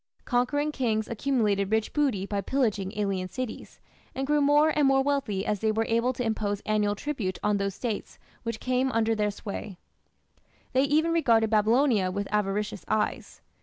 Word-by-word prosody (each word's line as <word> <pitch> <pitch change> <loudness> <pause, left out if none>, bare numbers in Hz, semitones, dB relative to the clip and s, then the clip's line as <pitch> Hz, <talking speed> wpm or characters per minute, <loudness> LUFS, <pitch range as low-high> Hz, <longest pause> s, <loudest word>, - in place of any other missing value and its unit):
Conquering 290 +5 +1
kings 220 -6 -1
accumulated 215 -5 0
rich 220 0 0
booty 265 -10 +1
by 200 0 -2
pillaging 210 -4 -1
alien 195 -3 -1
cities, 255 -1 -6 0.4
and 270 - -2
grew 295 +1 +2
more 295 +2 +5
and 295 -2 +4
more 270 0 +4
wealthy 270 -9 -1
as 210 - -1
they 220 +1 +1
were 225 +1 0
able 230 +2 +2
to 250 - -3
impose 205 -2 -1
annual 210 -1 0
tribute 210 -7 -3
on 210 0 +2
those 200 -1 -2
States 225 -5 -4 0.2
which 230 -2 -4
came 255 +1 0
under 225 0 +2
their 210 -1 0
sway. 200 -1 -7 1.0
They 265 +2 +4
even 310 +4 +2
regarded 230 -9 +3
Babylonia 220 -1 +3
with 200 +2 -3
avaricious 210 0 -1
eyes. 215 0 -2
220 Hz, 165 wpm, -27 LUFS, 205-265 Hz, 1.0 s, more